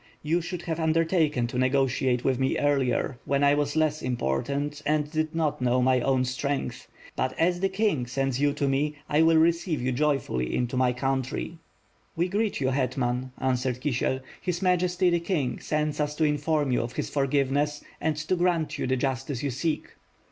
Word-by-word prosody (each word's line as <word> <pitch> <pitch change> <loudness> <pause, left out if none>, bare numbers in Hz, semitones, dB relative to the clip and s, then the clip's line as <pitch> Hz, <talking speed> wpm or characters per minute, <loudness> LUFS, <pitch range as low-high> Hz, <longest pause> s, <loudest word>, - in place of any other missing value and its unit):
You 165 +3 +1
should 175 +1 -5
have 165 -1 -3
undertaken 160 -4 +2
to 120 +1 -3
negotiate 130 -1 +1
with 130 -2 +1
me 130 0 +1
earlier, 135 -3 +1
when 140 0 +1
I 145 0 +5
was 145 0 0
less 155 -1 +1
important 140 - -2
and 150 0 0
did 155 0 -1
not 155 -5 0
know 125 0 +2
my 130 0 +3
own 130 0 +2
strength; 140 +2 -3 0.3
but, 130 0 -2
as 175 +2 +2
the 195 +1 +1
king 190 - 0
sends 135 +1 -1
you 145 0 +3
to 145 -1 -1
me, 145 +2 0
I 150 +1 +3
will 165 0 +5
receive 165 0 +2
you 125 +1 -1
joyfully 125 - 0
into 125 +1 -1
my 130 -1 +3
oount^/' 135 +5 -2 0.6
"We 170 +2 +1
greet 210 +2 0
you, 130 -2 +1
hetman," 130 -1 -1
answered 125 -1 -1
Kisiel. 130 -1 -1 0.2
"His 180 0 -2
Majesty, 180 0 +2
the 170 - +2
King, 165 -7 -1
sends 150 0 -1
us 150 0 -1
to 160 - 0
inform 150 -1 +1
you 125 - +2
of 120 +1 -5
his - - -3
forgiveness, 140 +1 0 0.2
and 160 -1 +1
to 150 +5 0
grant 175 -3 0
you - - -1
the 130 +1 +1
justice 135 0 -2
you 140 - 0
seek." 155 +6 -2
145 Hz, 185 wpm, -27 LUFS, 130-160 Hz, 0.6 s, I